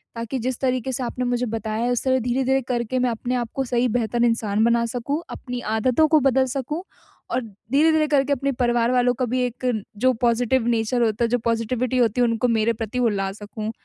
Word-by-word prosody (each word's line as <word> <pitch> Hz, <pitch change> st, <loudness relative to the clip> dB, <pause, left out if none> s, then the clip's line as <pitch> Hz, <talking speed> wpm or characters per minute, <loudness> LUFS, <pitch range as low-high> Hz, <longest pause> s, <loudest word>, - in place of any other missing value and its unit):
ताकि 230 Hz, +3 st, -4 dB
जिस 250 Hz, +1 st, -3 dB
तरीके 255 Hz, -1 st, 0 dB
से 255 Hz, 0 st, -3 dB
आपने 250 Hz, +1 st, -3 dB
मुझे 245 Hz, 0 st, 0 dB
बताया 220 Hz, 0 st, -3 dB
है 245 Hz, -, +1 dB
उस 245 Hz, -, -1 dB
तरह 260 Hz, -1 st, +2 dB
धीरे-धीरे 260 Hz, +2 st, +1 dB
करके 245 Hz, +1 st, -1 dB
मैं 250 Hz, -1 st, +2 dB
अपने 240 Hz, +2 st, -2 dB
आप 240 Hz, -2 st, -2 dB
को 270 Hz, -, 0 dB
सही 245 Hz, 0 st, +1 dB
बेहतर 235 Hz, 0 st, 0 dB
इंसान 220 Hz, -2 st, +1 dB
बना 235 Hz, 0 st, +3 dB
सकूँ, 250 Hz, +7 st, -3 dB
अपनी 245 Hz, -1 st, -6 dB, 0.2 s
आदतों 255 Hz, +7 st, +3 dB
को 310 Hz, 0 st, +4 dB
बदल 265 Hz, -1 st, +3 dB
सकूँ। 300 Hz, +7 st, -3 dB, 0.5 s
और -, -, 0 dB
धीरे-धीरे 290 Hz, +9 st, +1 dB
करके 280 Hz, -1 st, +2 dB
अपने 275 Hz, +1 st, -1 dB
परिवार 240 Hz, 0 st, +2 dB
वालों 245 Hz, -1 st, +3 dB
का 255 Hz, -, -1 dB
भी 255 Hz, -, +1 dB
एक 245 Hz, +1 st, -6 dB, 0.3 s
जो 255 Hz, +4 st, +3 dB
पॉज़िटिव 240 Hz, +1 st, +2 dB
नेचर 235 Hz, +1 st, +1 dB
होता 225 Hz, +1 st, 0 dB
है -, -, +3 dB
जो 245 Hz, -, +2 dB
पॉज़िटिविटी 230 Hz, +2 st, 0 dB
होती 240 Hz, 0 st, +2 dB
है 240 Hz, -, +4 dB
उनको 230 Hz, +2 st, +1 dB
मेरे 230 Hz, 0 st, +2 dB
प्रति 225 Hz, +2 st, -4 dB
वो 240 Hz, -2 st, +3 dB
ला 195 Hz, -2 st, -2 dB
सकूँ। 215 Hz, +1 st, -6 dB
245 Hz, 215 wpm, -23 LUFS, 230-255 Hz, 0.5 s, को